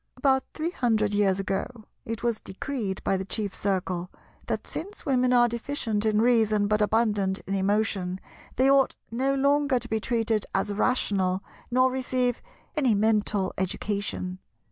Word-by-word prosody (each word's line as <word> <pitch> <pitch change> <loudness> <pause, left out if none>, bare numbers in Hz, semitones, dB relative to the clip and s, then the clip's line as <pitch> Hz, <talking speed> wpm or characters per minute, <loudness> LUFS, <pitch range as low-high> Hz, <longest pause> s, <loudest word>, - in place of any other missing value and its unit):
About 265 -2 +3
three 325 +2 -2
hundred 220 - +1
years 200 -2 +2
ago, 210 +4 -3 0.2
it 230 +1 -5
was 235 -2 0
decreed 200 -1 -4
by 195 - +1
the 190 - -3
Chief 200 0 -3
Circle 185 -2 -1 0.4
that, - - -2
since 405 +5 -6
women 255 -3 +2
are 240 -1 +5
deficient 230 -3 -2
in 215 0 +3
Reason 220 -4 +3
but 210 0 +1
abundant 210 -3 +1
in 195 - -3
Emotion, 195 -2 0 0.4
they 260 +2 +3
ought 275 -1 +4 0.2
no 265 +4 +1
longer 280 0 +3
to - - -3
be 220 - 0
treated 225 -2 0
as 195 +1 0
rational, 195 -5 +1 0.3
nor 255 +1 +3
receive 255 -2 0 0.3
any 260 -8 +3
mental 210 -2 +1
education. 190 -1 -2
220 Hz, 150 wpm, -26 LUFS, 200-250 Hz, 0.4 s, are